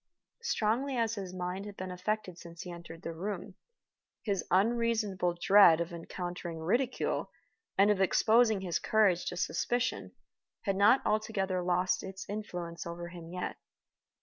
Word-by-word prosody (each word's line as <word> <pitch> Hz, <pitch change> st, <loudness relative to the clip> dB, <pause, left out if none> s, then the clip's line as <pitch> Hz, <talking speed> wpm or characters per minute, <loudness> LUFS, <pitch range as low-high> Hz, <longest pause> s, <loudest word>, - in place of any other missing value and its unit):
Strongly 255 Hz, -, 0 dB
as 230 Hz, -1 st, +1 dB
his 195 Hz, -4 st, -5 dB
mind 185 Hz, +2 st, -4 dB
had 205 Hz, -, -9 dB
been 185 Hz, 0 st, -5 dB
affected 185 Hz, 0 st, -2 dB
since 170 Hz, -1 st, -9 dB
he 180 Hz, -, -7 dB
had 170 Hz, -, -7 dB
entered 165 Hz, -1 st, -11 dB
the 165 Hz, -, -4 dB
room, 195 Hz, +3 st, -5 dB, 0.7 s
his 200 Hz, -4 st, -1 dB
unreasonable 210 Hz, -3 st, +1 dB
dread 185 Hz, -3 st, +7 dB
of 170 Hz, +1 st, -3 dB
encountering 175 Hz, 0 st, -5 dB
ridicule 235 Hz, +11 st, 0 dB, 0.5 s
and 200 Hz, +2 st, +6 dB
of 195 Hz, -2 st, +1 dB
exposing 220 Hz, +2 st, +4 dB
his 180 Hz, -3 st, -1 dB
courage 205 Hz, -5 st, +3 dB
to 180 Hz, -, -3 dB
suspicion 245 Hz, +6 st, -1 dB, 0.5 s
had 195 Hz, -2 st, 0 dB
not 205 Hz, +7 st, +5 dB
altogether 210 Hz, -4 st, 0 dB
lost 180 Hz, +1 st, +1 dB
its 190 Hz, 0 st, -8 dB
influence 175 Hz, -5 st, -5 dB
over 170 Hz, 0 st, -6 dB
him 175 Hz, -2 st, -10 dB
even 165 Hz, -, -10 dB
yet. 180 Hz, -, -4 dB
190 Hz, 150 wpm, -31 LUFS, 175-215 Hz, 0.7 s, dread